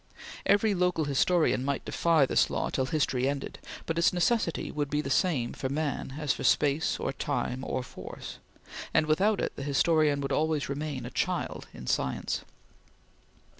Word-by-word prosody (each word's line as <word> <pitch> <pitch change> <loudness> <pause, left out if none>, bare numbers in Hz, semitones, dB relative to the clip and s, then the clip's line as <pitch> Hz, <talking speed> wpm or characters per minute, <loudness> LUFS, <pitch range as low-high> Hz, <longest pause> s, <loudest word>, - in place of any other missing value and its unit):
Every 205 +1 +4
local 180 -4 +1
historian 145 -1 +2
might 140 0 -2
defy 165 -4 +3
this - - +2
law - - -2
till 130 - 0
history 135 -3 +1
ended, 140 -1 -4 0.3
but 165 0 -1
its 170 - +4
necessity 180 0 0
would 145 -2 -2
be 150 - 0
the 140 -2 -3
same 135 -8 +1
for 130 - -3
man 140 -2 -2
as 150 -3 +1
for - - -6
space 145 +1 +2
or - - -2
time 130 +1 -2
or 130 - -2
force, - - -9 0.6
and 155 - +5
without 195 +8 +2
it - - -2
the - - -6
historian 145 +1 +2
would 140 - -3
always 155 -2 0
remain 140 -3 -3
a 125 - -6
child - - -2
in 60 - -10
science. 65 - -1
150 Hz, 170 wpm, -29 LUFS, 135-165 Hz, 0.6 s, and